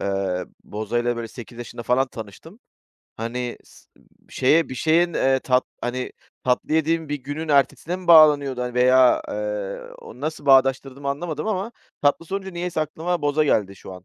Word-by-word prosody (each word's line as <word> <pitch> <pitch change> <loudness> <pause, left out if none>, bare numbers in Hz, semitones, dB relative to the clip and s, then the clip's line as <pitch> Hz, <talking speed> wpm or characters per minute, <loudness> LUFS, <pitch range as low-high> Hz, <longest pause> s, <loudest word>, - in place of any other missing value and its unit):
eee, 95 -2 -1 0.2
bozayla 120 +3 -2
böyle 115 -1 -5
8 120 +1 -11
yaşında 120 0 -7
falan 125 +3 +2
tanıştım. 115 - -11 0.6
Hani 120 +2 -4
s - - -20
ımm, - - -26 0.2
şeye 155 +5 +3
bir 130 - -6
şeyin, 165 +6 +2
eee, 135 0 +2
tat 130 0 +2 0.2
hani, 125 +1 -3 0.3
tatlı 125 +4 0
yediğim 160 0 +1
bir 145 - -1
günün 150 +4 -5
ertesine 150 +5 +1
mi 185 - -11
bağlanıyordu, 145 -6 +6
hani, 125 0 -4
veya, 130 0 +5
eee, 105 -2 -4 0.2
o 125 - -13
nasıl 155 -1 -4
bağdaştırdığımı 135 +1 +3
anlamadım 155 +3 -3
ama 215 +2 -2 0.3
tatlı 145 +3 +2
sorunca 190 +2 -4
niyeyse 175 -2 -3
aklıma 160 +2 -2
boza 145 +1 +2
geldi 100 -8 +1
şu 95 - -11
an 90 -1 -12
135 Hz, 165 wpm, -23 LUFS, 120-155 Hz, 0.6 s, bağlanıyordu